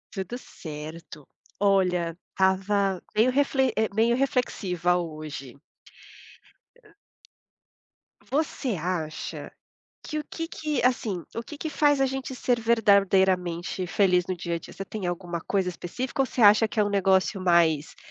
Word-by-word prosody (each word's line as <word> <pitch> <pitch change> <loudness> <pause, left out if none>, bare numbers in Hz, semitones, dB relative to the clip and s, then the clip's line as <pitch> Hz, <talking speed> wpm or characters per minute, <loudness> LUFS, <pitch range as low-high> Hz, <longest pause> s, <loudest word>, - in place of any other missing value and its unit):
Tudo 195 +5 -4
certo. 155 - -9 0.3
Olha, 180 -4 +2
estava 190 0 +1
meio 225 +4 +4
refle 265 -1 +2
eh, 220 0 +1
meio 230 +2 +3
reflexiva 190 -9 0
hoje. 155 -6 -5 2.7
Você 275 -5 -1
acha 165 -2 -4 0.5
que 305 - -3
o - - -4
que 330 0 -4
que 305 -5 -2
assim, 215 -8 0
o 230 - -2
que 300 +5 -10
que 315 - -4
faz 290 -2 +3
a - - +5
gente 265 0 -4
ser 245 -1 0
verdadeiramente 190 -5 +2
feliz 180 -2 +3
no 185 - -2
dia 170 -1 -3
a - - -3
dia? - - -12
Você 195 - -6
tem 200 -2 -5
alguma 175 -1 -3
coisa 190 0 0
específica 245 +10 -3
ou - - +2
você 245 - -3
acha 215 +1 +7
que 215 - -3
é - - +5
um 205 - -1
negócio 195 0 +2
mais 170 -4 +2
195 Hz, 145 wpm, -26 LUFS, 175-240 Hz, 2.7 s, acha